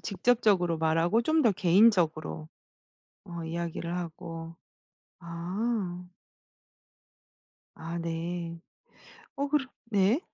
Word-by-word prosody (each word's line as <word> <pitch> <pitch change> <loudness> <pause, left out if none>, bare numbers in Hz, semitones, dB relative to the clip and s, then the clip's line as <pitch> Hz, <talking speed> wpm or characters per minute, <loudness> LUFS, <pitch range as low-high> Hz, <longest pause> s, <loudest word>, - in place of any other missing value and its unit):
직접적으로 195 -5 +2
말하고 165 +7 +3
좀 315 +3 +3
더 230 - +5
개인적으로 175 -5 +3 0.8
어 170 -3 -6
이야기를 170 +1 -3
하고. 165 -1 -6 0.6
아. 180 +2 -3 1.7
아 165 +1 -5
네. 170 0 -4 0.8
어 280 +1 -1
그러 285 -2 +1 0.2
네. 210 - +2
175 Hz, 170 characters per minute, -29 LUFS, 165-215 Hz, 1.7 s, 더